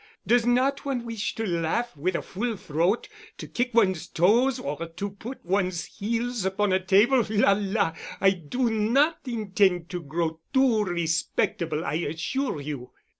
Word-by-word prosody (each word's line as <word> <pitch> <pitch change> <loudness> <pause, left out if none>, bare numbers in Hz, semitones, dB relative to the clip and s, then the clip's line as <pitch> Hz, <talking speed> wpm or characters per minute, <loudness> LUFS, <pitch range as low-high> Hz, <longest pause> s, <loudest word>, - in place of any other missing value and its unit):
Does 240 0 +3
not 260 +3 +2
one 260 -4 -2
wish 225 -2 -3
to 225 - -2
laugh 175 +6 -1
with 170 +5 -1
a - - -2
full 220 +3 -3
throat, 170 - 0 0.3
to - - -7
kick 245 0 -1
one's 190 -7 +3
toes 230 +10 +3
or 150 +4 -4
to 180 +5 -5
put 225 +5 -9
one's 185 -2 0
heels 230 +2 -2
upon 190 +1 +1
a 185 0 +1
table? 215 +7 +4
La 210 -2 +4
la! 200 -4 0 0.3
I 195 - +5
do 195 - -1
not 245 +9 +2
intend 195 -6 +1
to 180 -1 -3
grow 160 +1 -2 0.2
too 245 -5 +4
respectable, 165 -2 -1
I - - -2
assure 165 - -2
you." 140 -3 -6
200 Hz, 160 wpm, -26 LUFS, 170-235 Hz, 0.3 s, I